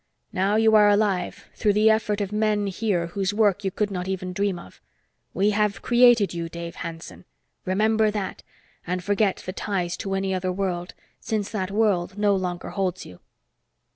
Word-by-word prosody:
Now 195 +3 +1
you 220 0 +4
are 210 -1 +7
alive, 205 -3 0
through 210 -2 +1
the 215 +2 +5
effort 215 -1 0
of 200 -1 -3
men 210 -1 +1
here 195 -3 -1
whose 190 +3 -2
work 205 -2 +2
you 195 - 0
could 205 +2 -2
not 180 -1 -4
even 185 -1 -3
dream 200 -1 0
of. 95 - -13 0.5
We 200 +3 +2
have 210 -3 0
created 240 -5 +5
you, 170 -1 -4
Dave 170 0 -7
Hanson. 165 +1 -8 0.4
Remember 215 +3 +2
that, 205 -2 -4 0.5
and 180 +1 -2
forget 205 0 +1
the 185 - -4
ties 180 -4 -2
to 195 -1 -3
any 195 0 -1
other 185 0 -1
world, 180 -2 -3 0.2
since 210 -3 -3
that 190 -4 -2
world 200 -3 0
no 205 -1 +3
longer 180 -2 -3
holds 185 -2 -2
you." 90 - -13
195 Hz, 175 wpm, -24 LUFS, 180-210 Hz, 0.5 s, are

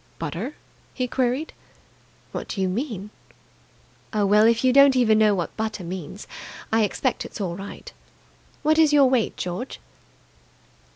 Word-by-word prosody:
"Butter?" 170 - -4 0.4
he 255 -1 -1
queried. 255 +4 -1 0.8
"What - - -5
do - - -5
you 190 - +1
mean?" 210 -1 -4 1.0
"Oh, 210 -1 +1
well, 210 +2 +5
if 230 +1 +2
you 255 -1 +4
don't 275 0 +7
even 220 -4 +4
know 210 -2 +4
what 175 -3 -3
butter 220 -3 -3
means, 180 +2 -7 0.5
I 225 - +4
expect 235 +4 0
it's - - -9
all 180 -4 -2
right. 195 +2 -9 0.7
What 310 +1 +3
is 310 -2 +5
your 285 -2 +7
weight, 255 -4 +1
George?" 180 +9 -5
220 Hz, 150 wpm, -24 LUFS, 195-260 Hz, 1.0 s, don't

